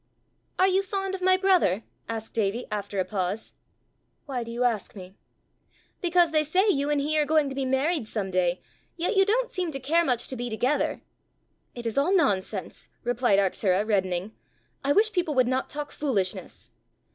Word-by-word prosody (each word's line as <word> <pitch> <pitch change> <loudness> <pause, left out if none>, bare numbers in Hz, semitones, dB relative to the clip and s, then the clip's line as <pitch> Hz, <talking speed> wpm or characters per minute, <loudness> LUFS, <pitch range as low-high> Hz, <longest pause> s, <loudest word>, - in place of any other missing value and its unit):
"Are 375 - +5
you 385 0 +3
fond 390 0 -3
of 380 - -4
my 370 0 +4
brother?" 365 - +3 0.3
asked 225 -1 -5
Davie, 220 +2 -1
after 205 -1 -4
a 185 - +1
pause. 200 +1 -3 0.7
"Why 260 -5 -3
do 230 - -9
you 240 +2 -2
ask 225 -5 -1
me?" 185 -1 -10 0.9
"Because 350 -2 +3
they 310 -1 +3
say 365 +7 +2
you 285 -7 +1
and 295 -1 +2
he 305 +2 +1
are 300 - +3
going 310 -2 +3
to - - -5
be 270 -1 -1
married 265 +1 0
some 200 -4 -3
day, 180 -1 +1 0.4
yet 355 +6 0
you 390 0 +5
don't 480 +4 +1
seem 360 -2 -2
to 270 -3 -4
care 320 +6 +2
much 245 -6 0
to 260 - -3
be 245 0 -4
together." 250 +6 0 0.7
"It 240 -1 -7
is 230 +3 +1
all 355 +8 +2
nonsense!" 205 - -1 0.2
replied 245 -4 +2
Arctura, 195 +1 +1
reddening. 190 -1 0 0.5
"I 280 - +1
wish 430 +7 +4
people 345 -5 0
would 255 -2 +4
not 260 +1 -1
talk 290 0 -5
foolishness!" 205 -11 -3
265 Hz, 185 wpm, -26 LUFS, 215-335 Hz, 0.9 s, Are